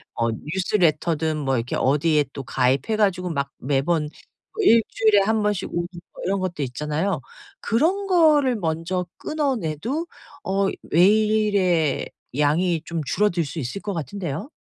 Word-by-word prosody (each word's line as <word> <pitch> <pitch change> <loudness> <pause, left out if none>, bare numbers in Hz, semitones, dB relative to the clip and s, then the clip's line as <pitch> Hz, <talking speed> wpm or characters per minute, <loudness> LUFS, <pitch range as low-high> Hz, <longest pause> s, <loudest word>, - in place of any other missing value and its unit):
어 115 0 0
뉴스 180 - -3
레터든 160 -2 +1
뭐 135 -3 0
이렇게 115 +1 -3
어디에 150 +2 +2
또 140 - -6
가입해 130 - +1
가지고 185 -4 +1
막 140 -3 -2
매번 150 +3 0 0.5
1 230 - +6
주일에 215 -2 +3
1 220 +2 +1
번씩 210 -3 -1
오는 175 0 -2 0.4
이런 195 +2 0
것들 170 -6 -2
있잖아요. 150 +6 -2 0.4
그런 340 - +1
거를 300 - +4
먼저 170 +1 -2
끊어 295 -4 -1
내도 225 - -3 0.4
어 195 +1 +1 0.2
메일의 200 -4 +3 0.3
양이 160 +3 +2
좀 170 -1 -3
줄어들 180 -4 +1
수 160 - -6
있을 130 +9 -4
것 205 - -4
같은데요. 165 - -4
175 Hz, 270 characters per minute, -23 LUFS, 150-210 Hz, 0.5 s, 1